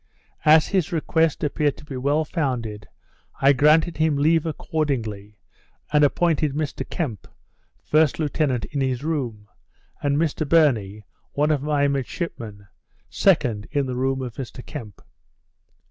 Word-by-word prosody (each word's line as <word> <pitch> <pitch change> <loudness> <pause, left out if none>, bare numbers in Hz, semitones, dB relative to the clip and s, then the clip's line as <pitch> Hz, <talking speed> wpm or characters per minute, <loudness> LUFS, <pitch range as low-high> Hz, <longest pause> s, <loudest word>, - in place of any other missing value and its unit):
As 155 0 +6
his 190 -6 0
request 160 -1 +1
appeared 150 -1 0
to - - -13
be 140 - -7
well 145 +5 +1
founded, 120 - -3 0.5
I 135 +1 +5
granted 155 +4 +3
him 155 -2 +2
leave 160 +3 +2
accordingly, 115 -11 -3 0.6
and 150 0 +5
appointed 155 -1 +2
Mr 150 0 -4
Kemp, 125 - -4 0.6
first 155 -2 +3
lieutenant 145 -6 0
in 140 - -4
his 130 -1 -1
room, 125 -10 -3 0.5
and 145 0 +1
Mr 155 -2 -1
Burney, 110 -11 +2 0.3
one 150 +2 +2
of 145 -3 +1
my 145 -1 +1
midshipmen, 125 - -4 0.5
second, 125 - +2
in 145 -3 0
the 130 -1 -4
room 130 +1 -1
of 125 -3 -6
Mr 125 -1 -7
Kemp. 105 -5 -9
145 Hz, 135 wpm, -23 LUFS, 125-155 Hz, 0.6 s, As